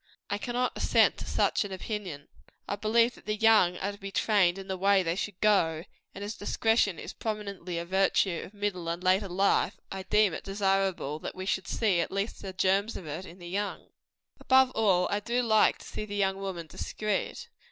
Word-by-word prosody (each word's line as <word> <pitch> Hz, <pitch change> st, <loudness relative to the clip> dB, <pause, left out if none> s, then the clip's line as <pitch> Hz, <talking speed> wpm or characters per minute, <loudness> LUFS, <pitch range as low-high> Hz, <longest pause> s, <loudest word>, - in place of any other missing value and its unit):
I 205 Hz, -, -1 dB
cannot 245 Hz, +2 st, -1 dB
assent -, -, +3 dB
to -, -, -7 dB
such -, -, +1 dB
an 205 Hz, -, -7 dB
opinion. 190 Hz, -6 st, -5 dB, 0.4 s
I -, -, -1 dB
believe 230 Hz, +3 st, +2 dB
that -, -, -18 dB
the 215 Hz, -, 0 dB
young 215 Hz, -5 st, +4 dB
are 200 Hz, +2 st, -2 dB
to 200 Hz, -, -12 dB
be 195 Hz, -1 st, -6 dB
trained 195 Hz, -4 st, +2 dB
in 195 Hz, 0 st, -8 dB
the 190 Hz, -, -2 dB
way 195 Hz, +1 st, +3 dB
they 165 Hz, 0 st, -1 dB
should 200 Hz, -1 st, -4 dB
go; 165 Hz, -7 st, +3 dB, 0.3 s
and 200 Hz, -, -6 dB
as 205 Hz, +2 st, -4 dB
discretion 220 Hz, -2 st, +1 dB
is -, -, -7 dB
prominently 200 Hz, -5 st, -4 dB
a 170 Hz, -, -3 dB
virtue 190 Hz, -1 st, +2 dB
of -, -, -10 dB
middle 200 Hz, -4 st, -3 dB
and 170 Hz, +2 st, -3 dB
later 190 Hz, +2 st, +2 dB
life, 195 Hz, +3 st, +1 dB
I 190 Hz, -, -4 dB
deem 205 Hz, -1 st, +3 dB
it -, -, -5 dB
desirable 195 Hz, -6 st, 0 dB
that -, -, -6 dB
we 185 Hz, 0 st, -6 dB
should 190 Hz, -1 st, -1 dB
see 205 Hz, -6 st, +1 dB
at 170 Hz, -, 0 dB
least 195 Hz, +3 st, -3 dB
the 195 Hz, -, -6 dB
germs 195 Hz, +4 st, +1 dB
of 180 Hz, -, -9 dB
it 155 Hz, +5 st, -6 dB
in 170 Hz, -, -12 dB
the 175 Hz, -2 st, -10 dB
young. 200 Hz, +3 st, -4 dB, 0.5 s
Above 260 Hz, 0 st, +4 dB
all, 195 Hz, -7 st, +2 dB, 0.2 s
do 240 Hz, +2 st, -1 dB
I -, -, +4 dB
like 220 Hz, -3 st, +4 dB
to -, -, -14 dB
see 215 Hz, -, -5 dB
the 205 Hz, -1 st, -6 dB
young 195 Hz, -1 st, +1 dB
woman 190 Hz, -4 st, -5 dB
discreet. 215 Hz, -, -3 dB
195 Hz, 210 wpm, -29 LUFS, 185-210 Hz, 0.5 s, young